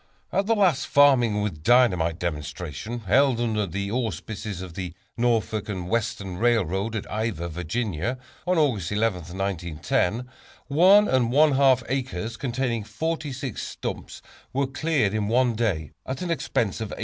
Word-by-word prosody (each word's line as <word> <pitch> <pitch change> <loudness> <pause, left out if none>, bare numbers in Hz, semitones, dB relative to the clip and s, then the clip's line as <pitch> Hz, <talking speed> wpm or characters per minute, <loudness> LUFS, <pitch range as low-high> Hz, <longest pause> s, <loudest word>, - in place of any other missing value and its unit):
At 195 +1 +1
the 225 - +3
latest 180 -10 +2
"Farming 120 -7 +4
with 80 -8 -4
Dynamite" 90 -7 +3
demonstration, 85 - -4
held 125 +5 +3
under 110 -4 0
the 100 +3 -3
auspices 110 -3 -3
of 90 -3 -9
the 90 -1 -5 0.2
Norfolk 110 -3 0
and 90 -4 -4
Western 105 -4 -2
Railroad, 110 -2 +1
at 110 - -3
Ivor, 105 -5 -2
Va., 90 +6 -2 0.3
on 180 0 +2
August 115 - +1
11, 95 -5 -1
1910, 95 +4 -1 0.4
one 190 +8 +6
and 125 -3 +2
one 150 +3 +5
half 135 -2 +4
acres, 120 -5 -3
containing 120 -3 -2
forty 155 +8 -3
six 130 -3 -5
stumps - - -6 0.3
were 140 +1 +1
cleared 135 -5 0
in 105 -1 0
one 120 +2 +3
day, 100 - -1 0.2
at 130 +5 -3
an 175 - -2
expense 120 - -1
of 110 - -3
$18. - - -6
115 Hz, 150 wpm, -25 LUFS, 95-130 Hz, 0.4 s, one